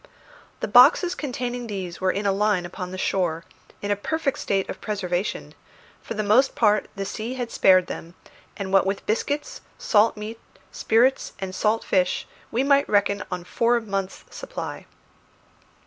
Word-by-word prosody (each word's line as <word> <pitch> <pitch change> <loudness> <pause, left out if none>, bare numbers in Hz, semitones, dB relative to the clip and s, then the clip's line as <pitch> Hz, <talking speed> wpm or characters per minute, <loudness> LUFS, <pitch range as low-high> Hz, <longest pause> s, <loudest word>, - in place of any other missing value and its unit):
The - - -1
boxes 360 -1 +6
containing 245 -4 -4
these 190 -5 -6
were 190 - +2
in 200 +2 -1
a 200 - +3
line 200 -2 +1
upon 180 +1 -6
the 185 - -7
shore, 175 -3 -1 0.4
in 205 - -1
a - - +3
perfect 275 +6 -2
state 195 -1 0
of - - -7
preservation; 195 -2 -3 0.5
for - - -6
the 215 - -1
most 240 +7 +3
part 210 -2 +2
the 195 -1 -3
sea 225 +5 -5
had 245 -2 -4
spared 185 -1 +5
them, 170 -1 -8 0.4
and 195 -1 -5
what 195 0 +4
with 195 0 -2
biscuits, 290 - -2 0.2
salt 215 0 +3
meat, 215 +2 -7 0.3
spirits, 245 +4 +2
and 190 -1 -5
salt 215 +3 +1
fish, 180 -1 0 0.2
we 245 +4 0
might 280 0 +3
reckon 205 0 +2
on 180 -1 -3
four 235 +6 +1
months' 195 -4 -4
supply. - - -7
205 Hz, 165 wpm, -24 LUFS, 190-235 Hz, 0.5 s, boxes